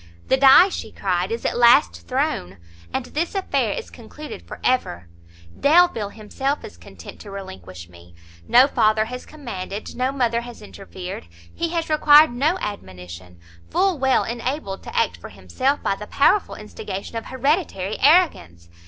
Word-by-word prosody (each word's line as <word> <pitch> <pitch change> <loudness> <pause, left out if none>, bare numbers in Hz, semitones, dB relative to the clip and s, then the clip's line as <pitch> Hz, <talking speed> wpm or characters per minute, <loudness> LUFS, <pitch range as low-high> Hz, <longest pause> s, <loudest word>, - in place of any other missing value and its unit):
"The - - +5
die," 275 +8 +7
she 225 - -6
cried, 185 0 -2
"is 230 - -4
at - - 0
last 90 - +4
thrown; 90 +2 -2 0.3
and - - -3
this 330 +6 -3
affair 390 - 0
is 485 - -7
concluded 300 0 -10
for - - -9
ever! 90 - -1 0.5
Delvile 295 - +3
himself 265 +7 -4
is - - -11
content 85 +1 -13
to 205 - -11
relinquish 95 - -9
me; 85 0 -18 0.3
no 250 +2 +6
father 215 -5 +2
has 250 +2 -8
commanded, 210 -9 -7
no 255 +2 0
mother 240 -4 0
has 240 -2 -11
interfered, 190 - -9 0.3
he 335 - -2
has 335 -1 -2
required 305 -1 +6
no 290 +9 0
admonition, 90 - -8 0.3
full 375 -5 +1
well 265 -1 +2
enabled 235 -3 -4
to 485 - -7
act 460 - +1
for - - -11
himself 275 +2 -2
by - - +1
the 210 +1 -8
powerful 385 +8 +2
instigation 210 0 -8
of 225 - -5
hereditary 260 - -1
arrogance! 255 - +2
230 Hz, 155 wpm, -22 LUFS, 185-285 Hz, 0.5 s, die